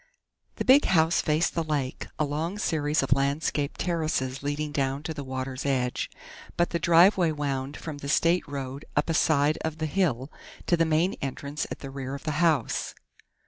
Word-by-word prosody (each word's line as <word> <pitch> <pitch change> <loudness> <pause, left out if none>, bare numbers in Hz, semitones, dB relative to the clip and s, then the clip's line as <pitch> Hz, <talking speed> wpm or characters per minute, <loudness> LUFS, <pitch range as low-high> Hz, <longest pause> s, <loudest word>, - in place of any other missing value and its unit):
The - - -3
big 270 +3 +6
house 165 -2 +3
faced 155 +2 +1
the 165 - 0
lake, 145 -4 -2
a 155 - +1
long 160 +7 -3
series 155 -6 0
of 135 - +3
landscaped 140 +1 -1
terraces 155 -6 -1
leading 145 +1 -2
down 140 0 -1
to 160 - -3
the 145 -2 -6
water's 130 0 -4
edge, 130 -3 -1 0.5
but 175 - +2
the 170 - 0
driveway 170 +1 +5
wound 140 -2 -3
from 155 -3 -7
the 140 - -6
state 170 +4 +2
road 140 -1 -5
up - - +1
a - - +1
side 155 -2 +3
of 160 -1 -3
the 155 - -2
hill, 150 -6 0 0.3
to 175 - +3
the 165 -1 +2
main 160 +4 +2
entrance 140 +2 -4
at - - -7
the 135 - -7
rear 135 0 -5
of 140 - -9
the 155 - -1
house. 155 -8 +1
150 Hz, 185 wpm, -27 LUFS, 135-165 Hz, 0.5 s, big